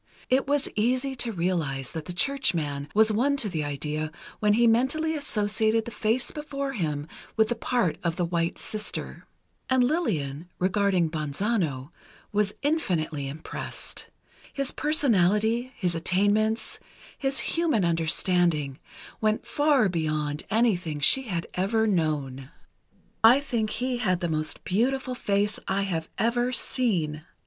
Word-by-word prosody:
It 265 +1 +3
was 285 0 +1
easy 255 +5 +1
to 240 -1 0
realize 165 - -1
that 160 -2 -5
the - - -5
churchman 165 - 0
was 220 +1 +5
won 270 +7 +2
to 230 - 0
the 160 -6 -2
idea 150 +2 -3 0.3
when 210 -1 +3
he 235 +3 +4
mentally 265 +8 +2
associated 220 -5 +1
the 235 - -6
face 225 +3 -1
before 280 -2 -4
him 150 - -2 0.3
with 220 -1 +4
the 240 - 0
part 230 -7 0
of 170 -2 0
the 175 - 0
White 170 0 -1
Sister. 215 0 -5 0.4
And 260 -1 +4
Lillian, 175 - -1
regarding 185 -3 +2
Bonzano, 155 - -1 0.4
was 205 -1 +1
infinitely 170 - 0
impressed. 150 +4 -5 0.4
His 275 -1 0
personality, 230 - +2
his 180 -3 0
attainments, 205 +6 +1 0.4
his 270 -1 -1
human 315 - +1
understanding, 165 -3 +1 0.4
went 215 0 +1
far 290 -6 +3
beyond 155 -4 -1
anything 185 -9 +1
she 260 - +3
had 170 -5 -2
ever 220 +5 +1
known. 150 -9 -1 0.7
"I 240 +5 +8
think 235 -6 -1
he 250 +3 -1
had 185 -7 +1
the 175 - -1
most 155 -1 -2
beautiful 255 +6 0
face 205 -3 0
I 200 +1 +1
have 165 -5 -3
ever 240 +2 +1
seen. 185 - 0
205 Hz, 135 wpm, -26 LUFS, 160-245 Hz, 0.7 s, I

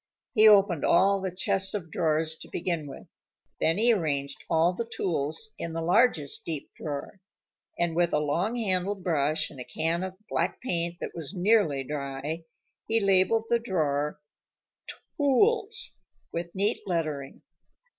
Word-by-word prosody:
He 220 -2 +7
opened 195 -7 +5
all 195 0 +4
the 190 - -2
chests 190 +2 0
of 165 -6 -5
drawers 160 0 0
to - - -12
begin 170 -4 -2
with. 135 - -10 0.5
Then 165 +2 +2
he 235 +2 +4
arranged 140 -7 -2
all 165 +2 +3
the 230 +4 -5
tools 165 +5 -2
in 165 - -4
the 165 - -3
largest 175 - +2
deep 155 -4 -5
drawer, 150 +6 -6 0.6
and 170 -1 0
with 175 0 +2
a - - +2
long 165 +10 0
handled 195 -3 -1
brush 155 -3 +1
and 140 - -12
a - - -4
can 160 +7 -1
of 185 0 -5
black - - -1
paint 170 -7 -1
that - - -5
was 165 +3 -4
nearly 185 -8 +3
dry, 145 +3 -5 0.4
he 225 +1 +2
labeled 195 +3 +3
the 235 0 +2
drawer 150 -9 -1 1.0
TOOLS 425 - +2 0.3
with 170 +1 -5
neat 205 +4 0
lettering. 155 -6 -3
170 Hz, 150 wpm, -27 LUFS, 155-200 Hz, 1.0 s, He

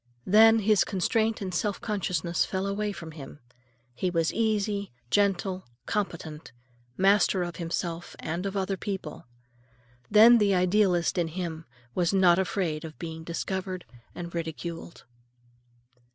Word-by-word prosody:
Then 225 +3 +7
his 210 -2 +4
constraint 220 +3 0
and 185 -2 -4
self 200 +3 -1
consciousness 180 -5 -1
fell 190 0 -2
away 205 +1 -1
from 165 -5 -8
him. 145 -2 -10 0.5
He 180 +9 -1
was 165 -2 0
easy, 210 -3 0 0.2
gentle, 195 -3 +1 0.2
competent, 165 - -4 0.5
master 195 -1 +3
of 175 -1 -6
himself 170 0 -4
and 175 +5 -3
of 195 +1 -4
other 195 0 -1
people. 190 - -6 0.8
Then 225 +3 +8
the 200 -2 +3
idealist 180 -1 +2
in 170 - +1
him 165 -1 -5 0.3
was 180 +2 +1
not 180 -2 +5
afraid 180 -5 -1
of 155 -2 -9
being 160 -1 -7
discovered 185 +2 -4 0.3
and 170 -1 -7
ridiculed. 165 0 -6
185 Hz, 130 wpm, -27 LUFS, 170-200 Hz, 0.8 s, Then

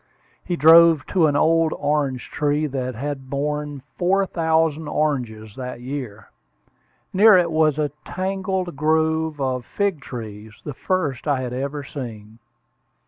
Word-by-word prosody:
He 175 - -2
drove 165 -1 +7
to 170 -4 +4
an 145 - 0
old 165 +2 +3
orange 145 -3 -1
tree 150 +1 0
that 130 -3 -3
had 135 +1 -5
borne 145 0 -3 0.2
four 195 +2 +2
thousand 160 -3 0
oranges 120 -9 -2
that 125 -2 -6
year. 125 -6 -7 0.8
Near 210 +1 +7
it 170 -2 +2
was 155 -2 +2
a 150 -2 0
tangled 190 -2 -3
grove 160 +1 +1
of 130 -2 -1
fig 200 +4 -1
trees, 110 -4 -9
the 145 - -5
first 155 -4 -2
I 140 -3 +1
had 125 -1 -4
ever 140 +3 -3
seen. 115 -5 -8
150 Hz, 140 wpm, -22 LUFS, 130-160 Hz, 0.8 s, drove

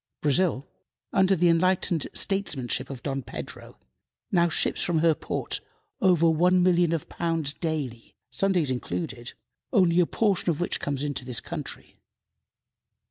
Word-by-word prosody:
Brazil, 150 -1 +2 0.5
under 190 0 +4
the 175 0 +3
enlightened 170 -1 +2
statesmanship 135 - 0
of 135 -3 -8
Dom 135 -1 -2
Pedro, - - -8 0.5
now 175 -2 +3
ships - - +1
from 175 -2 +1
her 160 0 +4
ports - - -3 0.4
over 175 -3 +4
one 180 +3 +3
million 175 -2 +3
of 165 -3 -2
pounds 165 -4 -1
daily, 145 -9 -4 0.2
Sundays 175 -1 +1
included, 125 -1 -4 0.4
only 180 -6 +4
a 175 - +4
portion 200 -5 +1
of 160 - 0
which 175 - -1
comes 140 -1 -3
to 140 -3 -3
this 125 -1 -1
country. 155 -4 -8
165 Hz, 135 wpm, -26 LUFS, 140-180 Hz, 0.5 s, under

